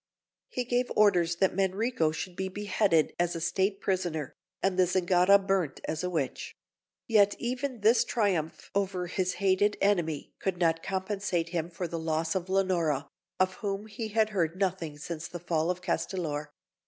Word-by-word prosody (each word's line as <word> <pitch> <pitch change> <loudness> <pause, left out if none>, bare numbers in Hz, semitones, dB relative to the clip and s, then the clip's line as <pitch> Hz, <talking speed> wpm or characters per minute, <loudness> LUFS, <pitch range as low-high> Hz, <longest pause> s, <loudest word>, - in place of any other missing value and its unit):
He 250 - -2
gave 245 +1 0
orders 180 -5 +4
that 190 +1 +1
Manrico 195 -2 +1
should 175 +3 -5
be 190 +1 -2
beheaded 200 -4 +1
as 175 0 +1
a - - -2
State 190 +4 0
prisoner, 175 -7 -2 0.3
and 195 -1 +2
the 185 -1 +4
Zingara 180 +2 +5
burnt 195 -6 -1
as 155 +2 -2
a 180 - 0
witch; 150 -7 -3 0.5
yet 205 -4 +4
even 250 0 -3
this 225 +2 +5
triumph 185 -10 -1
over 195 -2 0
his 185 +1 -1
hated 200 +1 +2
enemy 170 -7 0
could 190 -2 -1
not 165 -2 +2
compensate 190 -2 -2
him 170 -1 -2
for 175 +1 -4
the 165 0 -4
loss 160 0 -1
of 185 -1 -3
Leonora, 175 -7 +1 0.3
of 185 0 +2
whom 200 -1 -3
he 220 +1 -5
had 220 0 +2
heard 170 -5 0
nothing 185 -5 -2
since 165 +2 -5
the 175 - -7
fall 165 -1 0
of 180 0 -2
Castellor. 160 -4 -2
185 Hz, 165 wpm, -29 LUFS, 165-200 Hz, 0.5 s, Zingara